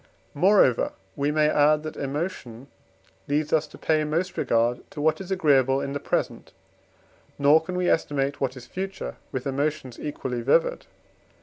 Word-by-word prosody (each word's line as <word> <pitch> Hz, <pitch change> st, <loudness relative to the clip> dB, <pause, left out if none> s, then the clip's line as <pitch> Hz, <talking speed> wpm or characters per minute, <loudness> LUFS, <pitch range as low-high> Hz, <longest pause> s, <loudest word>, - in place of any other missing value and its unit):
Moreover 175 Hz, -, +3 dB, 0.2 s
we 140 Hz, +1 st, 0 dB
may 150 Hz, 0 st, +3 dB
add 150 Hz, 0 st, +3 dB
that 155 Hz, -, -6 dB
emotion 140 Hz, -4 st, -4 dB, 0.6 s
leads 150 Hz, +1 st, 0 dB
us 155 Hz, -1 st, +2 dB
to -, -, -14 dB
pay 155 Hz, -1 st, +1 dB
most 170 Hz, +5 st, -2 dB
regard 120 Hz, +1 st, +1 dB
to -, -, -9 dB
what 155 Hz, +5 st, +1 dB
is 190 Hz, -, -8 dB
agreeable 135 Hz, -8 st, +3 dB
in 140 Hz, 0 st, -4 dB
the 145 Hz, -, -2 dB
present, -, -, -3 dB, 0.8 s
nor 145 Hz, +3 st, +5 dB
can 180 Hz, +2 st, -5 dB
we 180 Hz, 0 st, 0 dB
estimate 140 Hz, -3 st, 0 dB
what 130 Hz, -1 st, -1 dB
is 120 Hz, -, -10 dB
future 190 Hz, +6 st, -6 dB
with 130 Hz, -1 st, -4 dB
emotions 140 Hz, -2 st, -2 dB
equally 130 Hz, -4 st, -4 dB
vivid. 140 Hz, +7 st, +1 dB
145 Hz, 160 wpm, -25 LUFS, 135-160 Hz, 0.8 s, nor